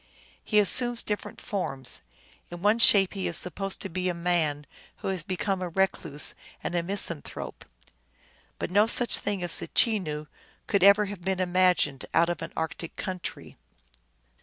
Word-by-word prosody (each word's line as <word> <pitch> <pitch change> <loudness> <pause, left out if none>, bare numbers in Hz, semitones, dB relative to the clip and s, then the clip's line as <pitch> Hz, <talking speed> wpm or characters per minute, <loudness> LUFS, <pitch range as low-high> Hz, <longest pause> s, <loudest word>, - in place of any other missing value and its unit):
He 215 - 0
assumes 240 +3 +4
different 210 -1 -5
forms; 135 -10 -4 0.5
in 175 +1 -9
one 210 +3 +3
shape 195 -4 +6
he 195 -2 -3
is 170 - +2
supposed 195 +2 -3
to - - -3
be 185 +1 -2
a 175 - -3
man 165 -4 0 0.3
who - - -5
has 190 -3 -1
become 185 +3 -2
a 180 - -3
recluse 170 -5 -1 0.3
and - - -3
a 175 - +1
misanthrope. 170 -4 -4 0.9
But - - -4
no 205 +3 +4
such 240 +1 +3
being 200 -3 -2
as 175 - +6
a - - -5
Chenoo 175 -10 +1 0.4
could 200 - 0
ever 200 +1 +6
have 200 -2 -8
been 190 +1 -2
imagined 180 -6 +1
out 170 +1 +4
of 175 - -3
an - - -6
arctic 160 +1 -4
country. 185 -2 -6
185 Hz, 160 wpm, -27 LUFS, 170-200 Hz, 0.9 s, shape